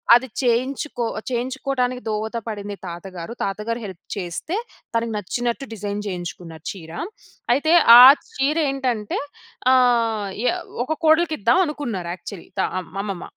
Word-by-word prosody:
అది 250 +2 +2
చేయించు‌కొ 250 +1 0 0.3
చేయించుకోటానికి 255 0 -1
దోహత 220 +2 -2
పడింది 205 -2 -5
తాతగారు. 175 +3 -7
తాతగారు 215 +4 -3
హెల్ప్ 185 -3 -9
చేస్తే, 190 - -3 0.4
తనకు 230 0 0
నచ్చినట్టు 240 +6 -2
డిజైన్ 205 -1 -4
చేయించుకున్నారు 175 -3 -7
చీర. 165 -5 -11 0.6
అయితే, 315 +5 +2 0.3
ఆ - - +12 0.3
చీరేంటంటే, 270 -6 0 0.5
ఆహ్, 230 -5 +3 0.2
ఎ - - +4
య - - +1 0.3
ఒక 315 0 -3
కోడలికిద్దావనుకున్నారు 295 - +2
యాక్చలీ. 185 -1 -10
త - - +4 0.4
మమ్మమ్మ. 195 -3 -3
230 Hz, 110 wpm, -22 LUFS, 200-260 Hz, 0.6 s, ఆ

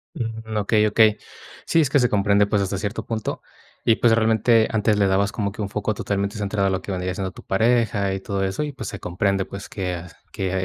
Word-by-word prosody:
Mm, 110 -4 -5
okey, 105 +1 +2
okey. 110 0 +4 0.5
Sí, 165 - +3
es 150 - +2
que 145 - +4
se 125 -2 +3
comprende, 100 0 +3
pues, 100 0 +1
hasta 100 +1 -2
cierto 100 +2 -4
punto, 110 -2 -3 0.4
y 115 - +4
pues, 115 -2 +4
realmente, 115 0 +3
antes 105 -1 +1
le 100 - +4
dabas 100 +2 +1
como 100 -3 -2
que 110 0 -5
un 100 - -2
foco 105 +1 -1
totalmente 100 +1 -2
centrado 100 -1 0
a - - 0
lo 95 -1 -2
que 100 - -5
vendría 90 0 -2
siendo 95 0 -4
tu - - -12
pareja 110 -2 +1
y 95 - -3
todo 95 0 -2
eso, 95 +9 -2
y 150 - -3
pues, 110 -7 -7
se - - -8
comprende, 95 +2 0
pues, 100 0 -8
que 90 -3 -3 0.3
que 95 -1 -2
100 Hz, 230 wpm, -23 LUFS, 95-110 Hz, 0.5 s, okey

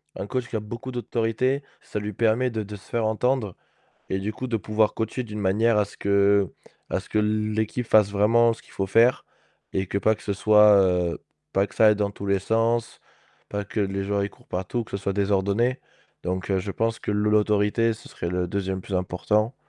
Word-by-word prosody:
un 100 - -5
coach 125 +1 -2
qui 115 - -7
a - - +1
beaucoup 120 +5 -7
d'autorité, 120 +3 -1 0.2
ça - - -7
lui 105 0 -3
permet 115 +4 +1
de 110 -1 -2
de 105 0 -7
se 100 - -15
faire 115 -2 0
entendre 110 -2 0 0.6
et 95 - +1
du 100 +3 -3
coup, 130 +4 -5
de 115 - 0
pouvoir 110 0 +1
coacher 110 +3 -2
d'une 105 -3 -7
manière 105 +3 +2
à 105 - +3
ce 100 - -14
que 100 -1 +3 0.4
à - - +1
ce - - -10
que 110 - 0
l'équipe 110 +2 -1
fasse 105 -2 +4
vraiment 115 +3 +4
ce - - -16
qu'il - - -21
faut 95 -1 -2
faire 115 +5 +4 0.5
et 95 0 -1
que 100 - -1
pas 110 +3 +2
que - - -17
ce 100 - -1
soit, 105 +1 +6
heu, 90 -2 +1 0.3
pas 95 +1 +2
que - - -17
ça 110 - +6
aille 105 - +6
dans 100 -1 0
tous 100 - -8
les 100 -1 +2
sens, 115 +3 0 0.5
pas 105 0 -3
que 100 - -6
les 100 -1 -1
gens 100 +1 0
ils 100 - -1
courent - - -23
partout, 95 +6 -2
que - - -18
ce - - -1
soit 100 0 -2
désordonné. 100 +5 +1 0.5
Donc 90 +2 -3
heu, 95 - +2
je 95 +2 -4
pense 115 +2 -1
que - - -3
l 105 - 0
l'autorité, 105 +1 +2
ce 110 - -11
serait 85 - -5
le 90 0 -1
2e 95 0 -2
plus 95 - -6
important 105 +6 0
105 Hz, 225 wpm, -25 LUFS, 100-115 Hz, 0.6 s, soit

